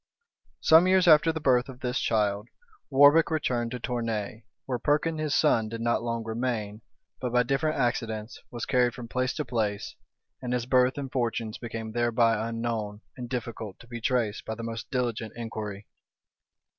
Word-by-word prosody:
Some 160 Hz, +3 st, +6 dB
years 185 Hz, -1 st, +4 dB
after 160 Hz, 0 st, +7 dB
the 160 Hz, -, -4 dB
birth 130 Hz, -3 st, +2 dB
of 130 Hz, -1 st, -11 dB
this 125 Hz, -1 st, -1 dB
child, 105 Hz, -1 st, 0 dB, 0.4 s
Warbec 145 Hz, +4 st, +6 dB
returned 125 Hz, -7 st, 0 dB
to 125 Hz, +1 st, -5 dB
Tournay; 115 Hz, -3 st, -3 dB, 0.2 s
where 125 Hz, -2 st, -2 dB
Perkin, 155 Hz, +4 st, +1 dB
his 155 Hz, -2 st, 0 dB
son, 115 Hz, -8 st, +3 dB
did 115 Hz, +1 st, -5 dB
not 120 Hz, 0 st, +1 dB
long 115 Hz, -1 st, -2 dB
remain, 110 Hz, -2 st, -3 dB, 0.4 s
but 125 Hz, -2 st, -3 dB
by 125 Hz, 0 st, +4 dB
different 135 Hz, +5 st, 0 dB
accidents, 115 Hz, -3 st, -2 dB
was 120 Hz, -, -5 dB
carried 125 Hz, -2 st, +2 dB
from 120 Hz, -2 st, -8 dB
place 130 Hz, +2 st, -1 dB
to 150 Hz, -, -2 dB
place, 105 Hz, -4 st, -2 dB, 0.5 s
and 125 Hz, -1 st, -3 dB
his 120 Hz, -1 st, -1 dB
birth 125 Hz, +1 st, +3 dB
and 135 Hz, -2 st, -5 dB
fortunes 115 Hz, -3 st, -2 dB
became 115 Hz, -2 st, -6 dB
thereby 115 Hz, -1 st, +2 dB
unknown, 115 Hz, -3 st, -3 dB
and 120 Hz, -1 st, -7 dB
difficult 115 Hz, -5 st, -5 dB
to 120 Hz, -, -16 dB
be 120 Hz, -1 st, -7 dB
traced 115 Hz, -3 st, 0 dB
by 110 Hz, -, -4 dB
the 115 Hz, -, -7 dB
most 115 Hz, 0 st, -5 dB
diligent 120 Hz, -4 st, -2 dB
inquiry. 110 Hz, -3 st, -6 dB
120 Hz, 170 wpm, -27 LUFS, 110-130 Hz, 0.5 s, after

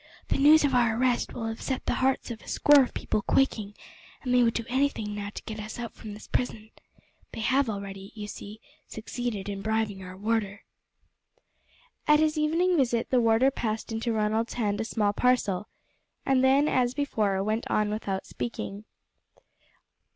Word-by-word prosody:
The -, -, +1 dB
news 300 Hz, +3 st, +7 dB
of 280 Hz, -2 st, +2 dB
our 235 Hz, -3 st, +3 dB
arrest 250 Hz, -1 st, +1 dB
will 230 Hz, -, -5 dB
have 225 Hz, 0 st, -4 dB
set 265 Hz, -, -3 dB
the -, -, +1 dB
hearts 260 Hz, -1 st, +1 dB
of 225 Hz, -, -7 dB
a -, -, -17 dB
score 290 Hz, -1 st, +6 dB
of 255 Hz, -, -1 dB
people 215 Hz, -, -1 dB
quaking, 215 Hz, -5 st, +1 dB, 0.5 s
and 250 Hz, -2 st, -1 dB
they 250 Hz, -, +5 dB
would 230 Hz, -1 st, +2 dB
do 230 Hz, -, -2 dB
anything 255 Hz, -5 st, 0 dB
now 205 Hz, 0 st, -4 dB
to -, -, -9 dB
get 220 Hz, 0 st, -6 dB
us 215 Hz, +1 st, -7 dB
out 240 Hz, -1 st, -5 dB
from 210 Hz, -2 st, -9 dB
this 210 Hz, -, -11 dB
prison. 220 Hz, -3 st, -3 dB, 0.6 s
They -, -, -5 dB
have 260 Hz, +2 st, +2 dB
already, 195 Hz, -1 st, -6 dB
you 210 Hz, -1 st, -6 dB
see, 210 Hz, +1 st, -9 dB, 0.3 s
succeeded 220 Hz, -2 st, -4 dB
in 200 Hz, -1 st, -4 dB
bribing 215 Hz, -2 st, -1 dB
our 185 Hz, 0 st, -9 dB
warder." 205 Hz, -1 st, -1 dB, 1.4 s
At 300 Hz, 0 st, +6 dB
his 310 Hz, 0 st, +2 dB
evening 330 Hz, +4 st, +2 dB
visit 240 Hz, -4 st, +1 dB
the 250 Hz, -2 st, +4 dB
warder 230 Hz, +4 st, +4 dB
passed 220 Hz, -3 st, -3 dB
into 225 Hz, +1 st, -1 dB
Ronald's 220 Hz, +1 st, 0 dB
hand 210 Hz, -3 st, 0 dB
a -, -, -2 dB
small 210 Hz, -2 st, 0 dB
parcel, 210 Hz, -5 st, +1 dB, 0.6 s
and 265 Hz, -1 st, +3 dB
then, 275 Hz, +3 st, +4 dB
as 250 Hz, -3 st, +1 dB
before, 210 Hz, -9 st, 0 dB
went 215 Hz, +3 st, -2 dB
out 215 Hz, -, +2 dB
without 205 Hz, -2 st, -3 dB
speaking. 210 Hz, -3 st, -5 dB
225 Hz, 180 wpm, -27 LUFS, 210-255 Hz, 1.4 s, news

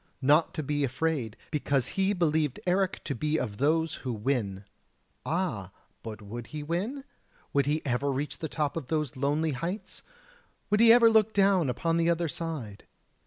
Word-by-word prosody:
not 150 Hz, +5 st, +4 dB
to 155 Hz, -, -4 dB
be 145 Hz, +1 st, -1 dB
afraid, 135 Hz, -4 st, -1 dB
because 140 Hz, -4 st, 0 dB
he 195 Hz, 0 st, +1 dB
believed 160 Hz, -7 st, +1 dB
Eric 185 Hz, +1 st, +1 dB
to 140 Hz, -, -2 dB
be 150 Hz, +4 st, 0 dB
of 110 Hz, -8 st, -3 dB
those 160 Hz, +5 st, +1 dB
who 130 Hz, -, -3 dB
win. 105 Hz, -4 st, -2 dB, 0.6 s
Ah! 140 Hz, -, -2 dB, 0.3 s
but 110 Hz, -2 st, -8 dB
would 115 Hz, +3 st, -7 dB
he 150 Hz, -1 st, -6 dB
win? 200 Hz, -, -2 dB, 0.5 s
Would 140 Hz, -1 st, +2 dB
he 155 Hz, +2 st, 0 dB
ever 140 Hz, +2 st, 0 dB
reach 140 Hz, +3 st, -3 dB
the 160 Hz, -, -4 dB
top 150 Hz, -3 st, -1 dB
of 160 Hz, -6 st, -4 dB
those 150 Hz, -3 st, -1 dB
lonely 145 Hz, +4 st, 0 dB
heights? 170 Hz, +10 st, -5 dB, 0.7 s
would 210 Hz, -, +4 dB
he 230 Hz, 0 st, +8 dB
ever 235 Hz, 0 st, +8 dB
look 220 Hz, -1 st, +3 dB
down 195 Hz, -6 st, +4 dB
upon 165 Hz, +7 st, 0 dB
the 170 Hz, 0 st, +2 dB
other 170 Hz, 0 st, +1 dB
side? 150 Hz, -11 st, -5 dB
150 Hz, 170 wpm, -28 LUFS, 130-170 Hz, 0.7 s, he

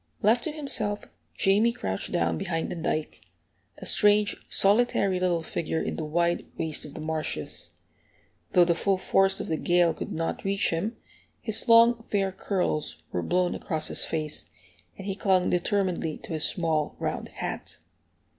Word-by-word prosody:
Left 225 Hz, +4 st, +4 dB
to 315 Hz, -, -1 dB
himself, 240 Hz, -9 st, -3 dB, 0.3 s
Jamie 205 Hz, +4 st, +4 dB
crouched 95 Hz, -, -3 dB
down 85 Hz, -1 st, +1 dB
behind 165 Hz, -2 st, -2 dB
the -, -, -3 dB
dike, 160 Hz, -2 st, -2 dB, 0.6 s
a -, -, -9 dB
strange, 210 Hz, 0 st, +4 dB
solitary 200 Hz, -2 st, +3 dB
little 175 Hz, -2 st, +1 dB
figure 160 Hz, 0 st, -2 dB
in -, -, -2 dB
the 160 Hz, -, -3 dB
wide 170 Hz, +3 st, 0 dB
waste 160 Hz, -2 st, -1 dB
of 150 Hz, -, -10 dB
the -, -, -6 dB
marshes. 155 Hz, 0 st, -3 dB, 0.8 s
Though 175 Hz, -, +7 dB
the 170 Hz, -, +3 dB
full 195 Hz, +3 st, +1 dB
force 195 Hz, +1 st, +3 dB
of -, -, -3 dB
the 160 Hz, -, 0 dB
gale 175 Hz, 0 st, +3 dB
could -, -, -6 dB
not 165 Hz, +1 st, -2 dB
reach 195 Hz, 0 st, +1 dB
him, 185 Hz, +8 st, -2 dB, 0.4 s
his 220 Hz, -2 st, -3 dB
long 230 Hz, 0 st, +6 dB
fair 195 Hz, -2 st, +1 dB
curls 155 Hz, -, -2 dB
were 90 Hz, -, -1 dB
blown 180 Hz, -, +1 dB
across 155 Hz, -3 st, -3 dB
his -, -, -1 dB
face, 155 Hz, -2 st, -2 dB, 0.5 s
and 195 Hz, -, -8 dB
he 195 Hz, -, -1 dB
clung 190 Hz, -2 st, +2 dB
determinedly 180 Hz, -3 st, 0 dB
to -, -, -6 dB
his 155 Hz, -1 st, +1 dB
small, 160 Hz, -4 st, 0 dB
round -, -, -3 dB
hat. -, -, -6 dB
180 Hz, 165 wpm, -27 LUFS, 160-200 Hz, 0.8 s, Though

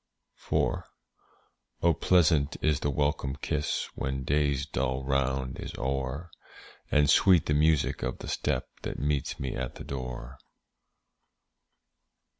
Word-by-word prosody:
IV. -, -, +2 dB, 1.1 s
Oh, 85 Hz, 0 st, +5 dB
pleasant 80 Hz, -3 st, +3 dB
is 75 Hz, -2 st, +2 dB
the 75 Hz, -, 0 dB
welcome 70 Hz, -1 st, 0 dB
kiss, 75 Hz, 0 st, -1 dB
When 65 Hz, 0 st, -3 dB
day's 70 Hz, 0 st, +1 dB
dull 65 Hz, -2 st, -1 dB
round 65 Hz, -1 st, 0 dB
is -, -, -6 dB
o'er, 65 Hz, +5 st, -2 dB, 0.6 s
And 75 Hz, -1 st, +4 dB
sweet 90 Hz, +3 st, +5 dB
the 75 Hz, -, +1 dB
music 75 Hz, 0 st, +2 dB
of -, -, -2 dB
the -, -, -8 dB
step 65 Hz, -, -1 dB
That -, -, -4 dB
meets 75 Hz, 0 st, -1 dB
me 65 Hz, -1 st, -3 dB
at 65 Hz, -1 st, -4 dB
the -, -, -8 dB
door. 65 Hz, -1 st, -6 dB
70 Hz, 125 wpm, -29 LUFS, 65-75 Hz, 1.1 s, Oh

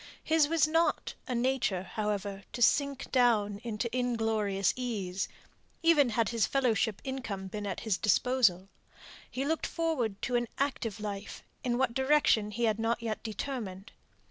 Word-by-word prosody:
His 315 Hz, -2 st, +3 dB
was 315 Hz, -1 st, +3 dB
not 325 Hz, +2 st, +1 dB
a 250 Hz, -, -2 dB
nature, 240 Hz, -7 st, +1 dB
however, 205 Hz, -1 st, -3 dB
to 240 Hz, -, -5 dB
sink 280 Hz, +2 st, +2 dB
down 215 Hz, -5 st, +3 dB
into 230 Hz, 0 st, -2 dB
inglorious 220 Hz, -6 st, +1 dB
ease, 200 Hz, -7 st, -3 dB, 0.6 s
even 305 Hz, -6 st, +5 dB
had 225 Hz, -1 st, +1 dB
his 230 Hz, -2 st, +1 dB
fellowship 230 Hz, -5 st, +1 dB
income 245 Hz, -8 st, -4 dB
been 205 Hz, +2 st, -5 dB
at 190 Hz, -, -4 dB
his 215 Hz, -5 st, 0 dB
disposal. 210 Hz, -4 st, +3 dB, 0.6 s
He 265 Hz, +2 st, -3 dB
looked 320 Hz, +2 st, 0 dB
forward 265 Hz, -, -1 dB
to 250 Hz, -, 0 dB
an 240 Hz, 0 st, +1 dB
active 240 Hz, -6 st, -2 dB
life; 205 Hz, -1 st, -6 dB, 0.2 s
in 240 Hz, -1 st, 0 dB
what 260 Hz, -2 st, +1 dB
direction 265 Hz, -5 st, +3 dB
he 235 Hz, +3 st, -3 dB
had 220 Hz, -1 st, +2 dB
not 230 Hz, +1 st, 0 dB
yet 220 Hz, -2 st, -3 dB
determined. 220 Hz, -4 st, -5 dB
230 Hz, 150 wpm, -30 LUFS, 205-265 Hz, 0.6 s, even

